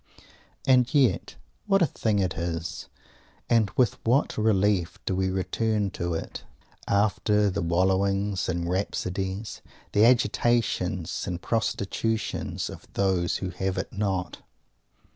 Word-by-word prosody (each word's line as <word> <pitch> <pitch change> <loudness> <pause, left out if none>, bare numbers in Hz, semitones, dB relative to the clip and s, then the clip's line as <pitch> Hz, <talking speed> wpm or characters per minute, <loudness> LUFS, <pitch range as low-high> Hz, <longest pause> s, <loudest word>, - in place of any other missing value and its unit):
And 125 -2 +4
yet 135 -4 +2 0.3
what 195 -2 +4
a - - +6
thing 110 -7 -1
it 95 -3 +1
is! 85 0 -4 0.6
And 115 -4 +4
with 125 -6 +2
what 125 +6 +2
relief 100 -4 +1
do 95 - 0
we 95 0 +1
return 100 +2 0
to 85 -1 -3
it, - - -6 0.4
after 105 0 +2
the - - -2
"wallowings" 95 +2 +1
and 85 -1 -1
"rhapsodies," 95 +2 -3 0.3
the 105 - +4
agitations 115 -6 +1
and 90 -1 -3
prostitutions, 110 +1 -2
of - - -10
those 95 -3 +1
who 90 - -3
have 95 +1 -2
it 95 - -4
not! 95 -3 -2
100 Hz, 125 wpm, -26 LUFS, 90-110 Hz, 0.6 s, a